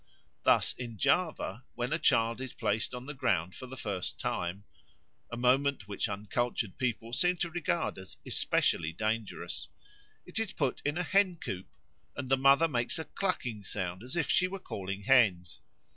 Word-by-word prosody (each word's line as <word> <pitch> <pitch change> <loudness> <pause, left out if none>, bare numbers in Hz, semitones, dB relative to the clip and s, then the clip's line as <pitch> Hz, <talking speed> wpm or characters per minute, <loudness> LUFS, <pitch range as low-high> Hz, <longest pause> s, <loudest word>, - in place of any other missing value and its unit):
Thus - - +4
in 120 -3 -6
Java 140 - +1
when 125 +4 -1
a 160 - +1
child 115 -2 +3
is 130 -1 -5
placed 110 +2 0
on 125 +1 -7
the 145 - -5
ground 95 - 0
for 130 - -9
the 130 +1 -9
first 100 -6 -3
time 90 +3 -2 0.7
(a 120 - -4
moment 130 -1 +2
which 100 -1 -1
uncultured 105 0 -2
people 120 -2 -1
seem 175 +8 +2
to 170 0 -1
regard 170 - -1
as 95 - -9
especially 80 0 +1
dangerous), 110 +3 -3 0.6
it - - -2
is 225 -3 -1
put 135 -4 -1
in 145 +3 0
a 180 - +1
hen 195 0 +3
coop 95 - -5 0.5
and 135 -3 -4
the 135 - +6
mother 140 +4 +6
makes 120 0 0
a 160 - -4
clucking 125 - -2
sound, 95 -1 -3
as 125 +7 -7
if 165 -6 +1
she 185 - +4
were 195 +1 -5
calling 100 - -5
hens. 100 - +3
125 Hz, 175 wpm, -31 LUFS, 100-145 Hz, 0.7 s, the